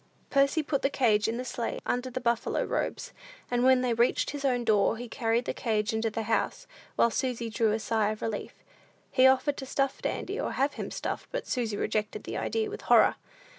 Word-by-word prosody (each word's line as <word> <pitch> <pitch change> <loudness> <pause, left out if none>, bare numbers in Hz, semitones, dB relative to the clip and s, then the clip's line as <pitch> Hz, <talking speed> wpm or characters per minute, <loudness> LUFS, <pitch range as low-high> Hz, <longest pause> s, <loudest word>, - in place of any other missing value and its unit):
Percy 275 +3 +3
put 280 -2 -1
the 275 - +2
cage 220 -6 +2
in 225 +1 -1
the 250 - -4
sleigh, 240 -1 -3
under 250 +1 -1
the 255 - -4
buffalo 235 -2 0
robes; - - -3 0.4
and 245 0 +2
when 260 0 +5
they 250 -2 +1
reached 235 +2 +2
his 290 -1 -6
own 250 -3 +1
door, 215 0 +3
he 245 +1 -6
carried 230 0 0
the - - -2
cage 215 -2 -1
into 220 0 0
the 220 +1 -3
house, 225 +1 -1 0.3
while 235 - +3
Susy 240 -2 -2
drew 220 -1 +2
a 215 - +1
sigh 220 -1 0
of 215 0 -5
relief. 220 -2 -5 0.5
He 255 0 +6
offered 265 +2 +3
to 265 - -5
stuff 275 0 -1
Dandy, - - -3
or - - -2
have 280 +2 +1
him - - -5
stuffed; - - -4
but - - -3
Susy 230 -5 -2
rejected 215 0 -2
the - - -6
idea 445 -1 -1
with 430 +1 -7
horror. - - +6
240 Hz, 210 wpm, -28 LUFS, 225-265 Hz, 0.5 s, He